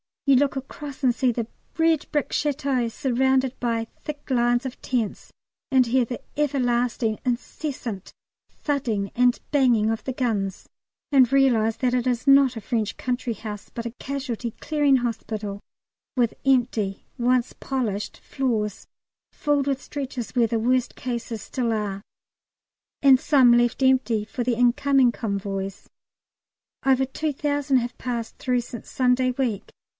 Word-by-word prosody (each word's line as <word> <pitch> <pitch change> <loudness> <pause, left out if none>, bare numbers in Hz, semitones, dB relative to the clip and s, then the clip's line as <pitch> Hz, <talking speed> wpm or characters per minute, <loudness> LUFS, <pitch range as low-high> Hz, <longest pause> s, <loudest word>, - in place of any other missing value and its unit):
You 275 -2 +5
look 280 +1 +2
across 275 +1 -7
and 250 -2 +4
see 255 0 +2
the 235 -1 -2 0.3
red 325 -2 +2
brick 295 -2 0
Château 275 -5 0
surrounded 265 +1 +1
by 230 -2 0 0.2
thick 290 -2 -7
lines 240 0 +2
of 260 - -6
tents, 235 -5 -2 0.4
and 260 -2 +5
hear 245 +1 +2
the 245 +1 -6 0.2
everlasting 245 -5 +1
incessant 245 - -4 0.4
thudding 235 -9 -2
and 245 0 +3
banging 240 -6 +3
of 225 - -3
the 260 - -2
guns, 210 -7 -2 0.4
and 260 -3 +5
realise 240 -5 +3
that 250 -1 +1
it 250 0 +1
is 250 +2 -1
not 275 -2 +6
a 225 - -5
French 220 -1 -2
country 250 -1 -2
house 210 -1 -8
but 235 - -6
a 235 - -3
Casualty 260 -4 -4
Clearing 290 -3 +3
Hospital, 220 -4 -3 0.6
with 240 -3 +2
empty 240 -7 +1
once 245 0 +2
polished 225 -7 -3
floors 220 -6 -2 0.5
filled 290 -2 0
with 275 -1 0
stretchers, 265 -4 -5
where 240 -2 +3
the 230 - 0
worst 250 +2 +1
cases 235 -3 -4
still 240 -3 -1
are, 205 -2 -2 1.0
and 270 -2 +7
some 260 -5 +5
left 240 +2 +2
empty 255 -5 +3
for 245 +3 -4
the 240 0 +1
incoming 245 +2 +4
convoys. 195 -3 -4 1.0
Over 265 0 +4
two 300 +3 -3
thousand 285 -1 +1
have 240 0 -2
passed 235 -3 -4
through 250 -1 0
since 235 0 -9
Sunday 255 0 +2
week. 245 -6 -2
250 Hz, 145 wpm, -24 LUFS, 230-270 Hz, 1.0 s, and